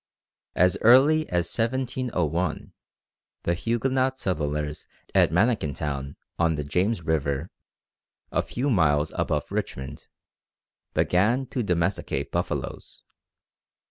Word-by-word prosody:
As 90 +1 +3
early 140 +7 +6
as 90 -1 +1
1701 115 - -1 0.7
the 85 - +1
Huguenot 130 +7 0
settlers 75 - -2 0.3
at - - +5
Manikintown, 75 - 0 0.2
on 85 -1 +3
the 75 - -3
James 90 +7 0
River, 75 -1 -1 0.8
a - - +2
few 135 +4 -2
miles 75 -6 +3
above - - -1
Richmond, 65 0 -4 0.9
began 110 +9 +2
to 130 - -3
domesticate 90 -2 -1
buffaloes. - - -3
90 Hz, 95 wpm, -26 LUFS, 75-120 Hz, 0.9 s, early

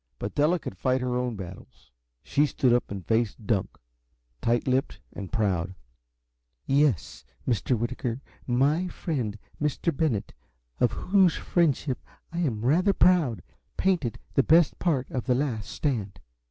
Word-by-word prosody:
But 100 - -4
Della 150 +5 +3
could 125 - -7
fight 130 +8 +1
her 125 -1 -1
own 125 -2 -1
battles. 95 -8 -10 0.3
She 150 +1 +2
stood 125 -3 +2
up 120 - +1
and 100 -3 -6
faced 110 -1 0
Dunk, 100 -4 -1 0.6
tight 120 +2 +1
lipped 130 +1 0
and 100 -2 -7
proud. 95 -6 0 0.9
"Yes, 135 - +1 0.2
Mr. 120 +1 +1
Whitaker, 120 +1 -2 0.3
my 140 +8 +2
friend, 125 - -3 0.2
Mr. 150 +2 0
Bennett, 135 -10 0 0.5
of 120 - +3
whose 190 -2 +3
friendship 145 -6 +1 0.3
I 170 - -2
am 120 -10 -1
rather 180 +9 +4
proud, 160 - +3 0.3
painted 175 -11 +1 0.2
the - - +5
best 160 +3 +4
part 140 -8 +1
of 130 -1 -3
'The 125 - +3
Last 125 -6 -2
Stand.'" 105 -10 -2
125 Hz, 140 wpm, -27 LUFS, 110-150 Hz, 0.9 s, the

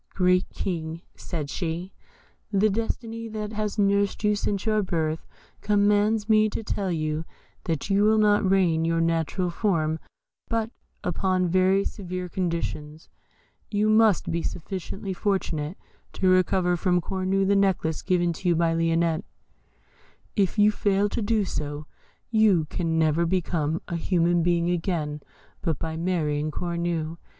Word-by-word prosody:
"Great 180 -1 +3
King," 165 -2 -4
said 155 -5 -5
she, 170 +4 -4 0.6
"the 205 +1 +3
destiny 230 +1 -3
that 215 -1 -5
has 210 0 -2
nursed 200 0 +1
you 210 0 +3
since 200 0 -2
your 215 -1 +2
birth 160 -4 -2 0.3
commands 205 +1 +2
me 215 -1 +4
to 225 - -4
tell 195 -3 -2
you 155 -1 -1 0.4
that 160 -4 -2
you 200 +1 +4
will 215 +1 +4
not 210 -1 +4
regain 185 -4 +3
your 165 0 +1
natural 165 +2 0
form 165 -5 0 0.5
but 230 -1 -1 0.3
upon 185 +1 +1
very 185 +2 +3
severe 185 -3 -4
conditions. 165 -4 -4 0.6
You 210 0 +1
must 215 -5 +4
be 170 +1 -1
sufficiently 190 +4 -5
fortunate 180 -5 -2 0.4
to 190 - 0
recover 185 -1 +3
from 180 +1 +2
Cornue 190 +2 0
the 200 +1 +3
necklace 190 -5 +1
given 175 -2 +1
to 180 +2 -2
you 170 - +3
by 165 0 +2
Lionette. 165 +1 +1 1.1
If 200 0 +1
you 210 0 +5
fail 205 -1 +1
to 230 - -2
do 215 -1 +1
so, 145 -2 -4 0.5
you 210 -8 +4
can 165 -2 -1
never 160 +1 +2
become 165 -3 -1
a 170 - -2
human 175 0 +2
being 170 0 +2
again 160 -4 -2 0.4
but 160 -4 -1
by 160 +2 -4
marrying 155 -3 -1
Cornue. 170 -1 -2
180 Hz, 140 wpm, -25 LUFS, 165-205 Hz, 1.1 s, you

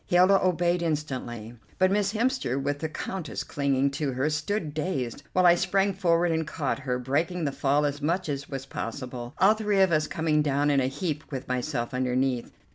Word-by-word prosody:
Hilda 185 +2 +5
obeyed 175 -1 +2
instantly, 130 -8 -3 0.2
but 185 0 +3
Miss 200 -1 +2
Hemster, 235 - 0
with 145 +1 -2
the 160 - -3
Countess 170 +1 -4
clinging 140 -1 0
to 140 -1 -2
her, 135 +5 0
stood 150 +1 -2
dazed, 145 -6 -2
while 185 0 +3
I 175 - +8
sprang 195 +3 +1
forward 175 -2 +2
and 160 -1 -1
caught 145 -4 -2
her, 130 -2 -2
breaking 155 +7 -1
the 140 - 0
fall 140 +2 +1
as 145 0 -2
much 170 +5 0
as 140 -1 -4
was 135 -1 -5
possible, 125 0 -6
all 195 +4 +6
three 210 -2 0
of 190 -2 +5
us 155 -1 +2
coming 155 -2 +1
down 145 0 +1
in 140 - +3
a 130 - +1
heap 155 +2 -3
with 135 -2 -5
myself 125 0 -2
underneath. 125 -1 0
150 Hz, 195 wpm, -27 LUFS, 135-175 Hz, 0.2 s, I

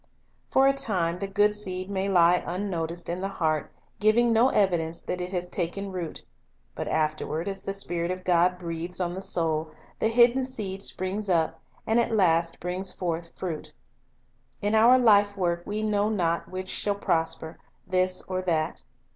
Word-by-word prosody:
For 265 - +4
a 275 - +5
time 180 -10 0
the 195 - -3
good 205 +2 +3
seed 185 -3 +1
may 195 0 -2
lie 175 -1 +4
unnoticed 175 -2 -3
in 175 +2 -3
the 195 - -1
heart, 160 -6 -1 0.3
giving 230 +3 +3
no 235 +4 +4
evidence 170 -7 +1
that 180 - -3
it 180 +1 -4
has 180 -2 -2
taken 190 +3 -3
root; 175 -4 -5 0.5
but - - -5
afterward, 155 +2 -1
as 195 -1 -3
the 195 - -3
Spirit 175 -3 -1
of 185 0 -4
God 180 0 +3
breathes 170 +1 -4
on 175 -1 -1
the 190 - -5
soul, 160 -4 0 0.3
the - - +2
hidden 240 +3 +4
seed 205 -7 -4
springs 195 +2 -3
up, 165 -3 +1 0.2
and 225 +2 +2
at 235 - +2
last 170 -5 +2
brings 180 +2 -2
forth 170 -2 -4
fruit. 170 -5 -5 0.9
In 205 +1 -1
our 230 +4 +6
life 205 -4 +4
work 175 -2 0
we 210 +1 -2
know 210 -1 +1
not 170 -5 -1
which 185 0 -6
shall 205 +1 0
prosper, 165 -4 -2 0.3
this 185 0 +1
or 185 0 -3
that. 165 -3 -1
185 Hz, 170 wpm, -26 LUFS, 170-205 Hz, 0.9 s, our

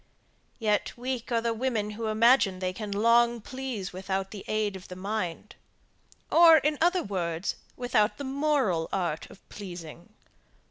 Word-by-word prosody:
Yet, 215 0 0
weak 250 -1 -4
are 230 -1 +2
the 230 0 0
women 225 -3 -1
who 220 +1 -4
imagine 220 -2 +4
that 185 - -12
they 185 - -1
can 210 +2 -6
long 235 +3 +3
please 245 -5 -5
without 190 +1 -3
the 205 -3 -8
aid 215 -2 -1
of 185 - -10
the 180 - -8
mind; 195 0 -4 0.8
or, 330 -1 +8
in 300 0 0
other 355 +2 +3
words, 175 -2 -2 0.2
without 245 -4 +1
the 285 - -5
moral 270 - 0
art 170 -5 -2
of - - -17
pleasing. 175 -3 -9
215 Hz, 155 wpm, -28 LUFS, 190-250 Hz, 0.8 s, or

